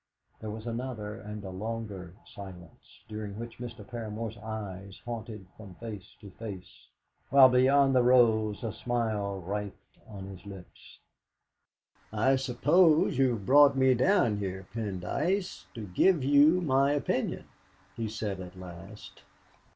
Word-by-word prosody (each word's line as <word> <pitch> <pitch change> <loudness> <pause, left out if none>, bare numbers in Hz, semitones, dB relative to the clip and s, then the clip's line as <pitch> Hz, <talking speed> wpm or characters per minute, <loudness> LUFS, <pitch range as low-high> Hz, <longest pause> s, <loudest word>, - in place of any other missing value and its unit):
There 110 - -6
was 110 +1 -7
another 115 -3 -4
and 105 0 -8
a 95 - -6
longer 100 -3 -6 0.2
silence, 90 -4 -12
during 105 -2 -6
which 115 +1 -8
Mr. 120 -1 -8
Paramor's 110 -1 -5
eyes 100 -3 -7
haunted 110 -4 -6
from 100 -4 -12
face 105 -2 -9
to 100 - -11
face, 100 -3 -9 0.4
while 135 -1 +8
beyond 135 +2 +4
the 130 - +5
rose 115 -4 +3
a 110 -2 -3
smile 110 -4 -2
writhed 100 +2 -6
on 100 -3 -8
his 95 -2 -10
lips. 95 -3 -12 1.1
"I 115 +5 +3
suppose 150 +4 +3
you 130 -2 +4
have 100 -3 -8
brought 140 +3 +6
me 130 0 +5
down 125 - +3
here, 95 -1 -4
Pendyce, 115 - -2
to 110 -3 -6
give 145 - +3
you 145 +6 +5
my 140 -2 +3
opinion," 145 -3 -1 0.5
he 115 -1 -3
said 105 -3 -4
at 90 0 -9
last. 95 +4 -11
110 Hz, 135 wpm, -29 LUFS, 100-130 Hz, 1.1 s, while